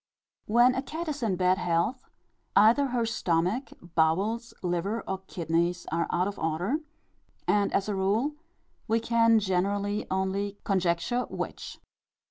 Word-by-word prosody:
When 240 +3 +5
a 265 - -1
cat 320 +5 -5
is 290 -2 -4
in 215 -5 +1
bad 185 +1 +2
health, 180 +9 -1 0.5
either 230 +7 +6
her 245 -2 0
stomach, 205 +2 0 0.2
bowels, 195 +9 +1
liver, 180 +5 -1
or 190 0 -2
kidneys, 170 +1 -1
are 170 +1 0
out 180 +2 +1
of 205 - -5
order; 165 - 0 0.7
and 205 -1 +2
as 200 - 0
a 210 - -1
rule 205 +9 +1 0.5
we 225 +1 +2
can 230 0 +4
generally 200 +1 -1
only 195 +2 -1
conjecture 185 +5 0
which. - - -5
200 Hz, 135 wpm, -28 LUFS, 180-230 Hz, 0.7 s, either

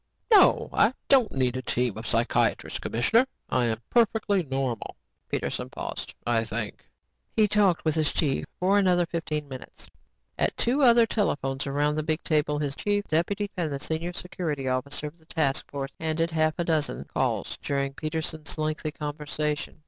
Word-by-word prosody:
No, 410 -3 +6
I 255 - +4
don't 260 -5 +5
need 130 -2 0
a 130 - -2
team 125 -3 0
of 110 +1 -6
psychiatrists, 115 +1 +1
commissioner. 225 - +2 0.2
I 125 -1 +2
am 110 -1 -1
perfectly 220 -4 +3
normal." 135 -5 -3 0.3
Peterson - - -2
paused. - - -6
"I 115 -1 +2
think!" 110 -1 -5 0.5
He 215 -1 +5
talked 200 -5 +2
with 155 - +3
his 155 -1 +1
chief 140 -4 0
for 195 +3 +4
another 180 -3 +3
fifteen 155 -3 -3
minutes. 130 -2 -10 0.5
At - - +1
two 255 +5 +2
other 235 -3 +7
telephones 140 -11 -1
around 145 +2 +1
the - - +1
big 155 +1 -1
table, 150 -1 +1
his 145 -2 -2
chief 205 0 0
deputy 200 +6 0
and 170 -5 -1
the 140 - -3
senior 160 +4 -2
security 160 -6 -4
officer 130 +4 -1
of 150 +3 -8
the 160 - -24
task 150 -4 0
force 140 -1 -4
handled 160 +1 0
a - - -10
half 155 -1 +2
dozen 160 -4 0
calls - - -2
during 140 -1 -1
Peterson's 155 0 -3
lengthy 155 0 -1
conversation. 150 0 -3
155 Hz, 165 wpm, -27 LUFS, 140-180 Hz, 0.5 s, other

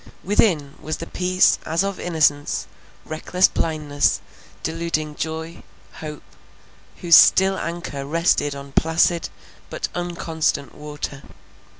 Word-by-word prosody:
Within, 170 -8 +1
was 155 +1 -3
the 165 - -6
peace 185 +2 +2
as 165 +4 0
of 200 -1 -3
innocence, 150 -4 +1 0.4
reckless 180 +4 +2
blindless, 150 -3 0 0.4
deluding 160 -2 -2
joy, 160 +2 -5 0.4
hope, 150 -1 -7 0.8
whose 170 -2 +6
still 190 +1 +6
anchor 165 -5 -5
rested 145 -1 +1
on 140 0 -9
placid 165 +3 +2 0.4
but - - -4
unconstant 165 -6 -2
water. 150 -2 -7
160 Hz, 105 wpm, -22 LUFS, 150-170 Hz, 0.8 s, whose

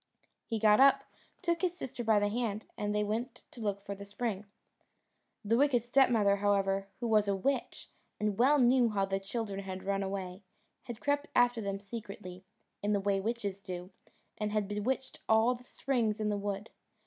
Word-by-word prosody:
He 225 - -1
got 210 0 +5
up, 275 +1 +6 0.4
took 340 -1 +1
his 360 -1 0
sister 245 -5 -5
by 220 -2 +4
the 205 0 +3
hand, 220 -2 -2
and 205 - -2
they 210 - +2
went 225 +5 -3
to 240 - -10
look 200 -2 -2
for 200 - -4
the 200 0 -9
spring. 205 0 -3 1.0
The 225 +3 +3
wicked 270 -5 +3
stepmother, 235 -5 +4
however, 195 -1 +1
who 240 - -2
was 215 -2 +3
a 200 - +2
witch, 260 +7 -2 0.3
and 210 -1 0
well 275 +5 +5
knew 250 -2 +5
how 200 -2 +1
the 195 0 -1
children 200 0 -4
had 190 -1 -6
run 195 0 0
away, 190 -1 -4 0.4
had 240 -3 -7
crept 285 +1 0
after 245 -1 +4
them 195 -1 -3
secretly, 195 -3 -8 0.4
in 205 +1 +1
the 200 - +2
way 195 0 +1
witches 205 -3 -3
do, 180 -1 -7 0.5
and 210 -1 -1
had 210 -2 0
bewitched 230 +6 -2
all 220 +3 +5
the 250 0 -11
springs 235 -5 -1
in 215 -1 0
the 210 - 0
wood. 200 +1 -4
210 Hz, 185 wpm, -32 LUFS, 200-240 Hz, 1.0 s, up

